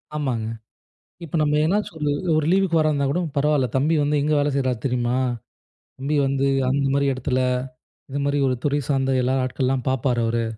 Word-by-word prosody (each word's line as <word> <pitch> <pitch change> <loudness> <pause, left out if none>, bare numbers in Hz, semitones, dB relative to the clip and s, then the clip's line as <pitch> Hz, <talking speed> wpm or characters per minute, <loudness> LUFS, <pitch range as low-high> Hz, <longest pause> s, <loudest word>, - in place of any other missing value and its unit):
ஆமாங்க. 125 -7 -2 0.8
இப்ப 165 - -6
நம்ம 150 0 +2
என்னாச்சுக்கு 185 -2 -1
வந்து 145 -1 0
ஒரு 180 -3 -1
ஒரு 155 - +1
லீவுக்கு 190 -3 +2
வர 155 - +3
இருந்தா 140 -2 0
கூட 175 - 0 0.2
பரவால்ல. 145 -2 +2
"தம்பி 150 +5 +2
வந்து 150 +1 +1
எங்க 150 +1 +1
வேல 145 - +1
செய்றாரு 130 -4 0
தெரியுமா? 125 -1 0 0.8
தம்பி 140 +3 -1
வந்து 135 0 0 0.2
அந்த 140 +1 +1
மாரி 140 0 +2
இடத்தில, 130 0 -1 0.7
இந்த 140 - -3
மாரி 140 0 +1
ஒரு 130 - +1
துறை 145 0 +1
சார்ந்த 135 -1 +1
எல்லா 130 +2 +1
ஆட்கள்லாம் 130 0 -1
பார்ப்பாரு 125 -2 0
அவரு." 115 0 0
140 Hz, 180 wpm, -22 LUFS, 130-150 Hz, 0.8 s, வர